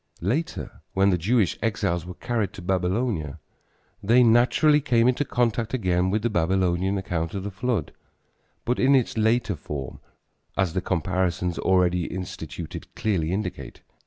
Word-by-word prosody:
Later 135 - -2
when 95 +1 +3
the 90 - +2
Jewish 105 +2 +1
exiles 100 -6 -1
were 90 - -7
carried 115 -2 -2
to 100 - -9
Babylonia, 90 - -1 0.6
they 120 +5 +5
naturally 125 +6 +4
came 120 -4 +3
into 130 +3 +2
contact 120 -2 0
again 90 -5 +1
with 105 +2 0
the 120 - +2
Babylonian 95 +1 +1
account 85 -2 -3
of 95 - -3
the 100 - -4
flood, 115 +4 -2 0.7
but 125 - 0
in 135 +2 +5
its 130 -3 +1
later 110 -2 +1
form, 70 -3 -6 0.6
as 95 -4 +1
the 95 - 0
comparisons 90 -1 -1
already 90 -2 +2
instituted 90 -1 -6
clearly 90 -7 0
indicate. 95 -1 -4
95 Hz, 145 wpm, -25 LUFS, 90-115 Hz, 0.7 s, they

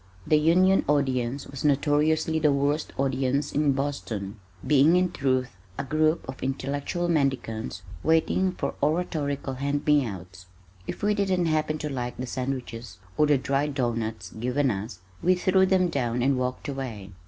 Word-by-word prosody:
The 155 - +4
Union 185 +5 +4
audience 135 -2 0
was 135 -2 -8
notoriously 150 +2 +2
the 150 -2 +3
worst 140 +2 0
audience 135 +1 0
in 145 -1 +2
Boston, 115 -7 -4 0.3
being 150 +3 +5
in 180 0 +2
truth 130 -2 0 0.3
a - - -2
group 155 +3 +1
of 130 0 -7
intellectual 140 +6 -2
mendicants 125 - -1 0.2
waiting 165 +3 +2
for 140 -6 -3
oratorical 145 -3 -1
hand 140 +2 -2
me 150 -2 +4
outs. 95 -4 -8 0.4
If - - -6
we 210 0 +3
didn't 190 -4 +1
happen 155 -1 0
to 150 - -4
like 125 -3 -4
the 125 - -3
sandwiches 125 -5 -5 0.2
or 150 - +3
the 145 -1 +4
dry 135 +2 0
doughnuts 115 -8 -2
given 125 +4 0
us, 100 -2 -6 0.2
we 185 +1 +4
threw 190 +1 +3
them 185 -1 +3
down 125 -5 -1
and 135 +1 +3
walked 125 +2 -3
away. 120 -8 -5
140 Hz, 155 wpm, -26 LUFS, 125-155 Hz, 0.4 s, being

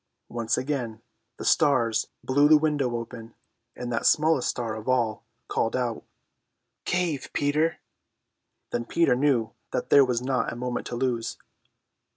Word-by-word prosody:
Once 115 -1 -1
again 125 -5 -3 0.4
the - - -7
stars 115 -6 +3 0.2
blew 145 +3 +4
the 155 - +8
window 145 -5 0
open, 115 -1 -7 0.4
and 120 -1 -5
that 115 - +1
smallest 155 -3 +3
star 115 -3 -2
of 110 +3 -6
all 120 -4 +1 0.2
called 115 - 0
out: 120 -3 -2 0.8
"Cave, 175 -6 -1
Peter!" 150 +3 +1 0.9
Then 120 - -1
Peter 165 -3 +2
knew 125 -4 +1 0.2
that - - -3
there 140 - +8
was 125 -3 0
not 130 0 -1
a - - -6
moment 125 0 -3
to 120 - -5
lose. 120 -2 -1
125 Hz, 145 wpm, -26 LUFS, 115-145 Hz, 0.9 s, the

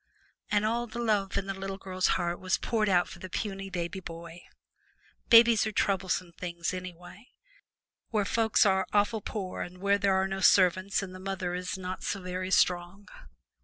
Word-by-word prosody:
And 210 0 +2
all 235 +2 0
the 230 +1 -9
love 210 -4 0
in 195 - -1
the 195 - -3
little 195 0 -5
girl's 185 -1 -1
heart 175 0 -2
was 185 0 0
poured 215 -3 0
out 175 -2 +3
for 180 - -11
the 185 - -8
puny 195 0 -4
baby 180 +1 -4
boy. 170 -1 -9 0.9
Babies 230 -1 +7
are - - -2
troublesome 190 -3 0
things, 170 0 -4
anyway, 185 +4 -9 0.8
where 210 -3 0
folks 220 +1 +3
are 190 -1 +2
awful 210 +1 +2
poor 195 -2 -5
and 180 +1 -7
where 200 +2 +2
there 195 -1 +2
are 190 0 +2
no 195 0 -4
servants 185 +1 +4
and 185 -2 -7
the 185 - -9
mother 185 -2 -3
is 180 +1 -3
not 185 0 -5
so 200 - -2
very 185 0 -4
strong. 180 +2 +1
190 Hz, 180 wpm, -29 LUFS, 180-205 Hz, 0.9 s, Babies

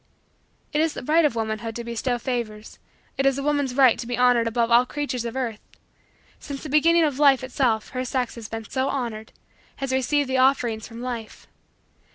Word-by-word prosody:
It 300 - +2
is 320 -1 +1
the - - -6
right 315 +4 +3
of 285 - +1
womanhood 225 0 -3
to 235 - -5
bestow 235 +2 -2
favors. 235 -4 -5 0.4
It 270 - +3
is 270 -1 +2
a 275 - -3
woman's 285 -3 0
right 260 -4 +5
to 235 - -5
be 245 -1 -2
honored 245 -2 +4
above 230 0 0
all 240 +1 +7
creatures 255 -2 -4
of 235 +1 -5
earth. 235 -5 -3 0.8
Since 280 -1 -7
the 310 - -6
beginning 330 +4 +4
of 290 -3 0
life 275 -3 +5
itself 250 -4 0
her 255 0 -3
sex 255 -1 -2
has 230 -2 -9
been 225 -1 -6
so 260 +1 -1
honored 230 -5 -4 0.4
has 270 -1 -4
received 280 +2 +1
the 260 0 0
offerings 245 -4 +2
from 230 +1 -9
life. 235 -3 -6
250 Hz, 200 wpm, -24 LUFS, 230-275 Hz, 0.8 s, all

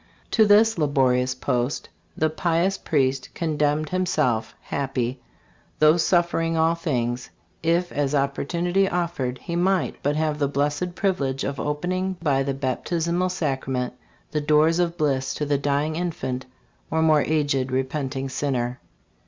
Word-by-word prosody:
'* - - -34
To 220 -2 +5
this 215 0 +5
la 150 - +3
borious 130 -2 +2
post 125 +1 -1 0.3
the 155 0 +1
pious 170 +3 +1
priest 135 -6 0
condemned 150 -2 0
himself, 150 -12 0
happy, 130 -2 -2 0.6
though 155 +2 +5
suffering 165 -1 +2
all 160 +1 +3
things, 125 -7 -2 0.3
if 170 +2 +1
as 145 0 0
opportunity 170 +7 +1
offered 170 -8 -2
he 170 - -5
might 185 +2 +1
but 145 +1 0
have 155 -1 0
the 140 - +2
blessed 145 +5 -1
privilege 140 -10 0
of 140 - -3
opening 185 +6 -1
by 140 -5 +1
the 135 0 -1
baptismal 170 +7 -1
sacrament 135 -6 -2 0.4
"the 150 - 0
doors 155 +3 +3
of 175 -1 0
bliss 135 -4 0
to 150 - -2
the 145 -1 +1
dying 145 +2 0
infant 130 -7 -3 0.4
or 160 0 +1
more 155 -2 +5
aged 145 -4 0
repenting 135 +1 -2
sinner." 130 -2 -2
150 Hz, 145 wpm, -24 LUFS, 135-170 Hz, 0.6 s, To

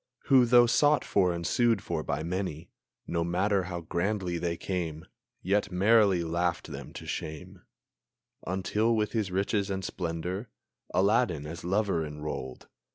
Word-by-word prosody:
Who, 130 -3 +7
though 120 0 +6
sought 145 +5 +3
for 90 -3 +2
and 85 0 -4
sued 115 -2 +2
for 85 -2 -2
by 80 - -3
many, 85 -2 -4 0.3
No 85 - -1
matter 95 +3 +1
how 90 -2 -5
grandly 90 +1 -1
they 85 -1 -2
came, 85 -5 -4 0.4
Yet 100 +2 +1
merrily 100 -1 +4
laughed 85 +1 -1
them - - -8
to - - -8
shame, 75 -2 -6 0.9
Until 100 +5 +1
with 105 -1 0
his 110 -4 -1
riches 100 +2 0
and 95 -1 -3
splendor, 90 +5 -4 0.4
Aladdin 95 -5 +2
as 80 +3 -7
lover 95 -2 +1
enrolled! 75 -4 -6
90 Hz, 145 wpm, -29 LUFS, 85-105 Hz, 0.9 s, Who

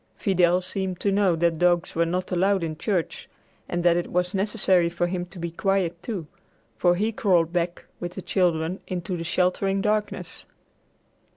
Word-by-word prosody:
Fidel 180 -2 +2
seemed 185 -1 -3
to 200 - +2
know 195 -3 +3
that 165 -1 +1
dogs 175 -1 +2
were 165 0 +1
not 180 +2 -2
allowed 190 +1 +2
in 160 -1 -3
church 180 +1 -2 0.4
and 175 0 -1
that 175 -1 +5
it 175 - -2
was 180 +2 0
necessary 190 -3 +2
for 175 +1 -1
him 175 0 -3
to 180 +2 -13
be 170 -1 -4
quiet, 180 -2 0
too, 185 -4 -4 0.5
for 175 -1 +3
he 215 +5 0
crawled 180 -6 +2
back 175 0 -1
with 175 0 -5
the 190 - -6
children 175 -1 0
into 180 0 -3
the 165 - -4
sheltering 185 +3 +1
darkness. 210 +1 -2
180 Hz, 175 wpm, -25 LUFS, 170-195 Hz, 0.5 s, that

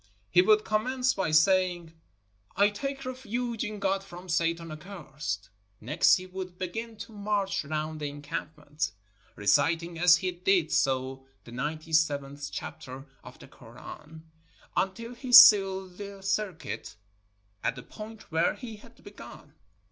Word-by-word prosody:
He 180 - +6
would 215 +3 +4
commence 250 +4 +1
by 190 -5 -1
saying, 175 +1 +2 0.6
"I 200 +2 +5
take 275 +6 -5
refuge 245 -2 -3
in 215 -1 -4
God 195 -1 0
from 180 -1 -11
Satan 165 -1 0
accursed." 150 - -6 0.3
Next 140 +9 +4
he 185 - -5
would 185 -1 -7
begin 225 +6 -5
to - - -9
march 205 -3 -1
round 155 +1 -3
the 145 -1 -3
encampment, 150 0 -5 0.4
reciting 165 +9 +1
as 175 0 +7
he 185 +2 -2
did 175 -2 +1
so 130 0 0 0.2
the 120 - -13
ninety 155 +5 -4
seventh 145 -2 0
chapter 130 +1 -7 0.2
of - - -12
the - - -14
Koran, 155 +1 -12 0.5
until 230 +5 -2
he 250 +1 -7
sealed 195 -5 +8
the 200 -1 -8
circuit 195 - -3 0.7
at - - 0
the 125 - -9
point 215 - -11
where 165 +2 +2
he 225 -4 -8
had 210 - -18
begun. - - -12
180 Hz, 140 wpm, -28 LUFS, 155-205 Hz, 0.7 s, sealed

